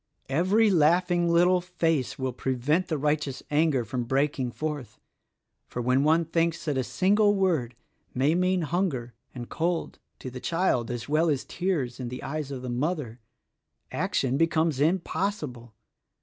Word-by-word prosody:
"Every 190 +9 +3
laughing 175 +1 +3
little 180 +2 +4
face 165 -6 -1
will 130 -1 -2
prevent 135 +8 0
the 155 - -1
righteous 150 -2 -1
anger 145 -5 +2
from 120 +1 -3
breaking 135 0 0
forth; 150 -1 -5 0.7
for - - -6
when 125 +3 +2
one 160 +2 +3
thinks 165 0 0
that 150 -3 0
a 130 - 0
single 205 - +3
word 160 - 0 0.4
may 135 +5 +2
mean 180 0 +1
hunger 150 -8 -1 0.2
and 120 -2 -6
cold 170 +1 -2 0.2
to 130 - -7
the 125 - -7
child 165 -7 0
as 120 -1 -4
well 155 +3 +2
as 140 -3 -1
tears 160 -10 -2
in 125 -2 -4
the 125 - -7
eyes 150 0 -4
of 130 -2 -6
the - - -5
mother, 125 -1 -2 0.7
action 130 0 0
becomes 160 -2 +1
impossible. 155 - -1
150 Hz, 150 wpm, -27 LUFS, 130-175 Hz, 0.7 s, little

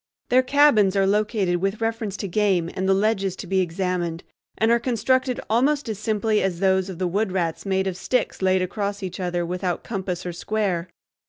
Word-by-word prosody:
Their 255 +1 +5
cabins 255 -8 +4
are 195 -1 +3
located 205 -2 +1
with 195 +4 -2
reference 225 -3 -2
to 200 - -4
game 185 -3 +1
and 190 +1 -1
the - - +6
ledges 195 -2 +1
to - - -8
be 190 +1 +1
examined, 175 -1 -2 0.3
and 225 +1 +3
are 235 - +4
constructed 255 +1 0
almost 275 +6 +2
as 215 -3 -4
simply 215 0 +1
as 185 -3 -1
those 190 0 +2
of 185 - -6
the 185 - -1
wood 195 +3 0
rats 170 -1 -2
made 190 0 +1
of 190 -2 -2
sticks 245 +5 -1
laid 185 -1 +3
across 200 +1 -3
each 185 0 -5
other 175 -1 -1
without 180 0 -2
compass 190 -4 -4
or 175 - -3
square. 185 -3 -2
195 Hz, 195 wpm, -23 LUFS, 180-220 Hz, 0.3 s, the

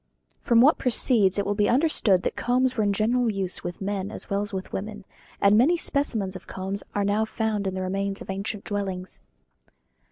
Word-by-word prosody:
From 235 -1 +4
what 290 +5 +5
precedes 230 -6 +2
it 200 - 0
will 205 - 0
be 205 0 +1
understood 240 - +2
that - - -2
combs 255 +1 +1
were 220 - +1
in 205 - +2
general 230 +3 +1
use 195 -3 -2
with 175 +1 -6
men 200 0 -2
as 215 - -5
well 200 0 +1
as 205 +2 -4
with 190 -1 -6
women; 205 0 -5 0.3
and 200 +1 +5
many 285 +11 +4
specimens 225 - -1
of 185 - -10
combs 195 +1 -4
are 205 -1 +1
now 205 +2 +1
found 220 -2 -2
in 190 - -3
the 185 - -3
remains 195 +1 -2
of - - -6
ancient 200 +1 -4
dwellings. 190 -3 -4
205 Hz, 200 wpm, -25 LUFS, 195-230 Hz, 0.3 s, what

